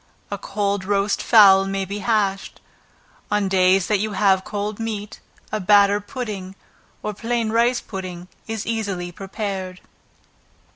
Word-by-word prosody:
A -, -, -2 dB
cold 200 Hz, -2 st, -2 dB
roast 200 Hz, +1 st, 0 dB
fowl 195 Hz, -4 st, +7 dB
may 195 Hz, 0 st, -2 dB
be 200 Hz, +2 st, -5 dB
hashed. 200 Hz, -2 st, -1 dB, 0.7 s
On 205 Hz, -1 st, +1 dB
days 190 Hz, 0 st, +3 dB
that 210 Hz, -2 st, +1 dB
you 215 Hz, +1 st, -2 dB
have 190 Hz, -1 st, +3 dB
cold 205 Hz, +1 st, -4 dB
meat, 215 Hz, -2 st, -5 dB, 0.3 s
a 215 Hz, -, -1 dB
batter 205 Hz, +1 st, +4 dB
pudding, 205 Hz, -6 st, -6 dB, 0.5 s
or 210 Hz, -, -3 dB
plain 230 Hz, +1 st, -2 dB
rice 235 Hz, +2 st, +2 dB
pudding, 180 Hz, -3 st, -7 dB, 0.2 s
is 225 Hz, -2 st, -4 dB
easily 200 Hz, -6 st, -3 dB
prepared. 190 Hz, -1 st, -5 dB
200 Hz, 135 wpm, -22 LUFS, 190-215 Hz, 0.7 s, fowl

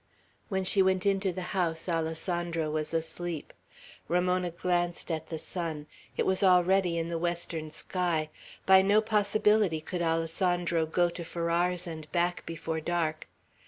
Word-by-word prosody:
When 190 Hz, -2 st, 0 dB
she 195 Hz, +1 st, +3 dB
went 190 Hz, 0 st, +2 dB
into 195 Hz, -1 st, +2 dB
the 185 Hz, +1 st, -5 dB
house, 170 Hz, -4 st, 0 dB
Alessandro 165 Hz, -1 st, -1 dB
was 155 Hz, 0 st, -2 dB
asleep. 165 Hz, 0 st, -3 dB, 0.5 s
Ramona 180 Hz, +1 st, +1 dB
glanced 175 Hz, 0 st, -1 dB
at 160 Hz, -1 st, -3 dB
the 160 Hz, -, -3 dB
sun. 160 Hz, -2 st, -4 dB, 0.3 s
It -, -, +1 dB
was 190 Hz, 0 st, +2 dB
already 180 Hz, -1 st, +4 dB
in 165 Hz, 0 st, -2 dB
the 170 Hz, -1 st, -2 dB
western 170 Hz, -2 st, -2 dB
sky. 160 Hz, -1 st, -2 dB, 0.3 s
By 190 Hz, 0 st, +7 dB
no 200 Hz, +2 st, +4 dB
possibility 210 Hz, -4 st, +2 dB
could 175 Hz, +3 st, -4 dB
Alessandro 165 Hz, 0 st, +1 dB
go 175 Hz, +2 st, +2 dB
to 170 Hz, -, -6 dB
Farrar's 170 Hz, +2 st, 0 dB
and 160 Hz, -3 st, -8 dB
back 175 Hz, 0 st, 0 dB
before 160 Hz, -1 st, -3 dB
dark. 160 Hz, -2 st, -1 dB
175 Hz, 145 wpm, -29 LUFS, 165-185 Hz, 0.5 s, By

